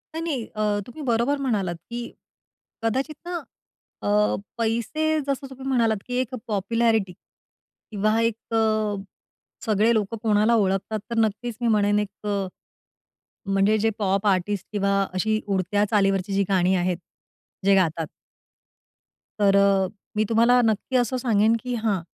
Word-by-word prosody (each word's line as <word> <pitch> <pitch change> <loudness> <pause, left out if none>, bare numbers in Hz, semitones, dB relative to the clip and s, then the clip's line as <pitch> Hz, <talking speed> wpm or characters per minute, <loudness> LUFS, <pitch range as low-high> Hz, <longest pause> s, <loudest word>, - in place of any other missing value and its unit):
नाही, 325 - -2
नाही, 275 -9 -2
अ, 210 -1 +1
तुम्ही 245 +6 -9
बरोबर 240 +5 +2
म्हणालात, 200 -9 0
की 240 0 -5 0.7
कदाचित 265 +7 -1
ना, 355 0 -4 0.7
अ, - - -4 0.5
पैसे, 235 +8 0
जसं 275 0 -2
तुम्ही 265 0 -8
म्हणालात, 230 -5 +2
की 250 - -5
एक 255 0 -4
पॉप्युलॅरिटी 220 -1 +1 0.8
किंवा 215 +2 +1
एक, 230 -1 +1 0.2
अ, 215 -2 +1 0.7
सगळे 220 +1 +3
लोकं 220 0 -1
कोणाला 215 +1 +3
ओळखतात, 200 +1 0
तर 235 - -3
नक्कीच 220 +2 0
मी 240 - +1
म्हणेन, 205 -2 +3
एक, 210 0 -5 1.2
म्हणजे 195 +2 +3
जे 225 +1 +2
पॉप 195 0 0
आर्टिस्ट 195 0 +1
किंवा 200 -1 +1 0.2
अशी 215 +4 +1
उडत्या 200 +1 +1
चालीवरची 195 -2 +2
जी 200 - +3
गाणी 190 -1 +3
आहेत, 180 0 0 0.7
जे 200 0 +5
गातात 165 -4 +1 1.3
तर, 200 -1 +4
अ, 200 -1 +4 0.3
मी 215 - +2
तुम्हाला 235 +2 +5
नक्की 225 +3 0
असं 245 +1 +1
सांगेन, 225 -3 +3
की 250 - -3
हां, 215 -4 0
215 Hz, 140 wpm, -24 LUFS, 200-235 Hz, 1.3 s, जे